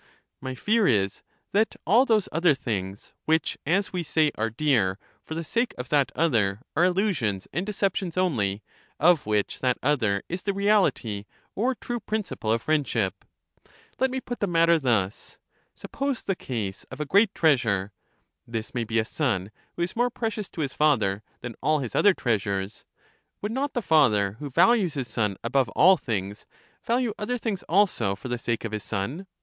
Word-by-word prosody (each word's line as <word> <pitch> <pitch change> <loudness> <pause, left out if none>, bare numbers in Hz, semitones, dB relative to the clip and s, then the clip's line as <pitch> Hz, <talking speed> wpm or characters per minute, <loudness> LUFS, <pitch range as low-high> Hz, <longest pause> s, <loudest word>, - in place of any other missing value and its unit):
My 130 -1 -5
fear 215 - +2
is 100 -4 +1 0.3
that 215 +2 +2
all 235 +9 +5
those 215 -4 +3
other 165 -2 +3
things, 100 -5 -5
which, 160 0 +1
as 190 +5 +1
we 180 - -1
say, 155 -1 +2
are 115 +1 -1
dear 115 -7 +1 0.3
for 160 - -6
the 165 - -3
sake 235 +9 -1
of 125 0 -6
that 145 -3 +2
other, 115 -9 +1
are 175 - +4
illusions 175 - 0
and 175 +7 -2
deceptions 195 -4 -1
only, 110 - 0 0.4
of 165 -6 +4
which 105 -1 0
that 125 -1 +1
other 115 -9 +1
is 180 +2 -4
the 200 +1 -1
reality 185 - +1 0.3
or 250 +5 0
true 240 +1 -4
principle 210 - -3
of 115 0 0
friendship. 135 -10 0 0.8
Let 265 - +3
me 260 +1 -2
put 245 -1 -6
the 205 - 0
mat 165 -1 +3
ter 170 -1 +5
thus: 110 -7 -1 0.4
Suppose 275 -2 -3
the 195 - -1
case 110 - -4
of 130 - -11
a 150 - -1
great 200 +7 +3
treasure 115 - +2 0.6
(this 115 -1 -5
may 120 -2 -1
be 115 0 -2
a 110 - +2
son, 110 - -1 0.2
who 170 - -1
is 175 - -4
more 245 +1 +2
precious 220 -4 -4
to 165 - -6
his 140 -3 -2
father 110 -10 +2 0.2
than 120 -1 -6
all 155 0 +2
his 130 -6 -4
other 205 -2 +4
treasures); 100 -3 -2 0.6
would 210 - -2
not 270 +4 -2
the 240 - -1
father, 105 - +3
who 145 - -5
values 185 - +3
his 135 -4 -3
son 105 -5 -1
above 130 +2 +1
all 190 +1 +7
things, 105 - -4 0.4
value 235 -1 0
other 245 +4 -1
things 215 -5 -3
also 165 - +2
for 115 +6 -8
the 120 0 -2
sake 115 -1 -2
of 110 - -4
his 105 -2 -4
son? 125 - -4
150 Hz, 180 wpm, -26 LUFS, -, 0.8 s, all